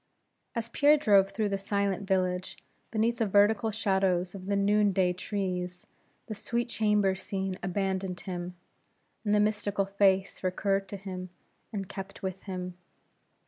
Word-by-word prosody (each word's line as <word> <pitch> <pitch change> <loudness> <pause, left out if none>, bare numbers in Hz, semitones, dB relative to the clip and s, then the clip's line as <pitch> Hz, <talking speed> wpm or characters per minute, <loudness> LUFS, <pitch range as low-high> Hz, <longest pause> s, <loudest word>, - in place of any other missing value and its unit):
As 230 -1 -2
Pierre 295 +5 +5
drove 200 -8 +5
through 215 -1 -1
the 195 0 -1
silent 200 -1 -1
village, 185 -1 0 0.3
beneath 230 +1 +1
the 225 - +2
vertical 205 +2 +4
shadows 190 -4 +1
of 190 -1 -8
the 200 - +1
noon 205 0 +3
day 180 -1 +2
trees, 180 -2 -3 0.4
the 220 - -5
sweet 235 +3 -2
chamber 210 -3 +2
scene 190 0 -4
abandoned 190 -1 -2
him, 180 -1 -5 0.7
and 210 -1 +2
the - - +4
mystical 205 -1 +1
face 195 -1 +2
recurred 195 +1 0
to 200 - -6
him, 185 -1 -6 0.4
and 200 -4 -4
kept 195 +1 -8
with 190 0 -3
him. 180 -2 -4
195 Hz, 145 wpm, -29 LUFS, 185-210 Hz, 0.7 s, Pierre